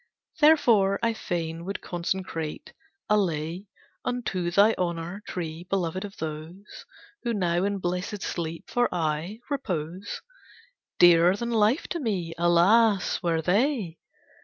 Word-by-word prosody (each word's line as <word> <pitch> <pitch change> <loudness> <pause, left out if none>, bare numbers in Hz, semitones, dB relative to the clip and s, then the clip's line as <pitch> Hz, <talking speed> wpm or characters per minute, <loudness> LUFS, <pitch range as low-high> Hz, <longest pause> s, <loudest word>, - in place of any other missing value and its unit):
Therefore 230 -11 +5
I 230 0 +2
fain 165 -5 -4
would 195 +3 -4
consecrate 170 -3 -4 0.3
a 210 - +4
lay 170 +1 -2 0.4
Unto 195 -8 -2
thy 200 +5 +5
honour, 175 +2 -3
Tree, 165 -1 -5
beloved 185 -1 -1
of 200 -1 -8
those 160 +5 -7 0.3
Who 235 -2 -1
now 175 -2 +1
in 200 0 -1
blessed 180 +3 -3
sleep, 165 -1 -4
for 245 0 +1
aye, 165 +6 -2
repose, 185 - -4 0.7
Dearer 175 +1 +6
than 235 +3 -3
life 225 +5 +2
to 340 - -2
me, 190 - -2
alas! 190 +5 +4
were 165 -2 0
they! 200 - +1
180 Hz, 125 wpm, -26 LUFS, 170-210 Hz, 0.7 s, Dearer